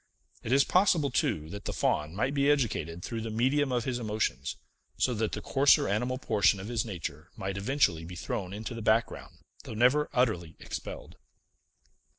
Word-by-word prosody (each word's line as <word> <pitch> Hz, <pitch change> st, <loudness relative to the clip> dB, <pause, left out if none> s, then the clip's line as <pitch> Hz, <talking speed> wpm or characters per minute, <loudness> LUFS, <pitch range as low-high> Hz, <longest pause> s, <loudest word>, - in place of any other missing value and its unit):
It 110 Hz, -, -5 dB
is 135 Hz, +1 st, +6 dB
possible, 170 Hz, -5 st, +3 dB
too, 80 Hz, -9 st, 0 dB
that 100 Hz, 0 st, -8 dB
the -, -, -3 dB
Faun 75 Hz, +3 st, 0 dB
might 130 Hz, +7 st, 0 dB
be 140 Hz, 0 st, +2 dB
educated 95 Hz, -, 0 dB
through 115 Hz, -2 st, -4 dB
the 115 Hz, -, -4 dB
medium 130 Hz, +5 st, +1 dB
of 120 Hz, -2 st, 0 dB
his 125 Hz, -1 st, -2 dB
emotions, 110 Hz, -2 st, -2 dB, 0.4 s
so 125 Hz, -, +2 dB
that 110 Hz, -1 st, -1 dB
the -, -, -4 dB
coarser 135 Hz, +1 st, +4 dB
animal 120 Hz, +6 st, 0 dB
portion 105 Hz, -5 st, +2 dB
of 95 Hz, +4 st, -6 dB
his 115 Hz, -2 st, 0 dB
nature 85 Hz, -6 st, -6 dB
might 95 Hz, -2 st, -3 dB
eventually 100 Hz, -, +1 dB
be 90 Hz, +2 st, -8 dB
thrown 90 Hz, +1 st, -4 dB
into 110 Hz, +4 st, -5 dB
the 115 Hz, -, -6 dB
background, 95 Hz, -, 0 dB, 0.3 s
though 125 Hz, -6 st, -7 dB
never 130 Hz, +6 st, +3 dB
utterly 110 Hz, -, 0 dB
expelled. -, -, -7 dB
110 Hz, 175 wpm, -29 LUFS, 95-130 Hz, 0.4 s, is